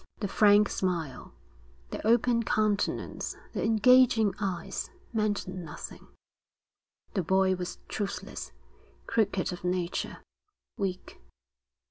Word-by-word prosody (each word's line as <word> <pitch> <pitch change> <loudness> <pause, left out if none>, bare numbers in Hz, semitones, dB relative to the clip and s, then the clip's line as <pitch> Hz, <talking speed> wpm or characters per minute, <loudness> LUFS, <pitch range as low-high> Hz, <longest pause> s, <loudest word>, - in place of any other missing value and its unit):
The 205 - -1
frank 205 +1 +5
smile, 170 -10 -2 0.6
the - - -5
open 235 +1 +4
countenance, 215 -1 0 0.2
the - - -2
engaging 225 -1 +5
eyes, 185 -5 -3 0.2
meant 210 -3 0
nothing; 180 -5 -8 1.1
the 195 - +1
boy 190 +2 +3
was 180 -1 -4
truthless, 205 -2 -4 0.5
crooked 200 -5 +1
of 175 - -9
nature, 180 -1 -2 0.5
weak. 185 -2 -4
200 Hz, 95 wpm, -29 LUFS, 180-215 Hz, 1.1 s, frank